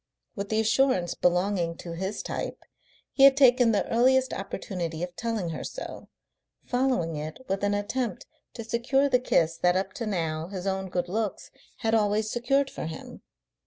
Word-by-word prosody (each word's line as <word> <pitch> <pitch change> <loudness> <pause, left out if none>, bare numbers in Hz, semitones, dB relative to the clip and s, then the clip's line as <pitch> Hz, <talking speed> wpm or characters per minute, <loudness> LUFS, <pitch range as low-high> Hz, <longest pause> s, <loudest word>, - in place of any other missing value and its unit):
With 200 -2 -4
the 220 - +1
assurance 220 -5 +2
belonging 180 -1 +1
to 170 - -8
his 190 +4 -4
type, - - -5 0.5
he - - -2
had 275 0 +8
taken 250 -3 +6
the 205 - +1
earliest 260 +3 +3
opportunity 180 -4 -4
of 180 0 -5
telling 220 -2 -2
her 160 - -5
so, - - -7 0.6
following 245 -11 0
it 155 +1 -5
with 195 +1 -2
an 205 0 +2
attempt 220 +1 -2 0.3
to 230 - -5
secure 240 +5 +1
the 250 - +4
kiss 165 -9 +1
that 180 0 +3
up 190 0 -1
to 230 - -4
now 165 -5 -2
his 185 -1 -6
own 190 -1 -2
good 180 -1 -1
looks 210 +2 -3 0.3
had 225 0 +1
always 215 0 +2
secured 275 +3 +1
for - - -5
him. 160 - -9
205 Hz, 170 wpm, -27 LUFS, 180-240 Hz, 0.6 s, had